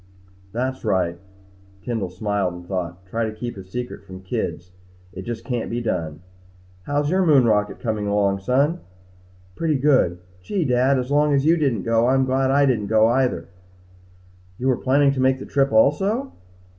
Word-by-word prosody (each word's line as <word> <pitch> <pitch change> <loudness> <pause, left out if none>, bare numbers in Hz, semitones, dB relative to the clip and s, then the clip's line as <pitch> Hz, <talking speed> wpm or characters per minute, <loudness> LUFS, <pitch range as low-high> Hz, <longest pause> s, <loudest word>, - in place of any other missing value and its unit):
"That's 130 +4 -3
right." 85 -3 0 0.6
Kendall 115 -7 -2
smiled 95 -1 -2
and 90 0 -10
thought. 90 -1 -4
Try 115 +5 -2
to 110 - -3
keep 120 +2 -5
a 95 - -9
secret 125 +7 -6
from 95 -1 -10
the 95 - -14
kids. 90 -1 -4 0.4
It 95 +1 -8
just 115 -1 -5
can't 125 -3 -3
be 120 - -2
done. 85 -9 -3 0.7
"How's 145 +1 0
your 190 +1 +2
moon 145 -7 +5
rocket 105 -2 +1
coming 110 -3 -2
along, 100 -1 +1
son?" 140 - +1 0.8
"Pretty 160 -3 0
good. 130 -11 +3 0.2
Gee, 180 - -2
Dad! 130 +1 +3
As 125 +1 -3
long 145 0 +3
as 135 +1 +1
you 165 +2 +5
didn't 135 - 0
go, 115 +1 +2
I'm 130 +1 +3
glad 130 0 +1
I 140 +1 +4
didn't 115 -6 0
go 110 +1 +4
either." 125 +1 0 1.1
"You 130 +2 -1
were 130 - +3
planning 140 +2 +3
to 135 - -3
make 130 0 +3
the - - -8
trip 135 0 +1
also?" 195 - +2
120 Hz, 180 wpm, -22 LUFS, 100-140 Hz, 1.1 s, moon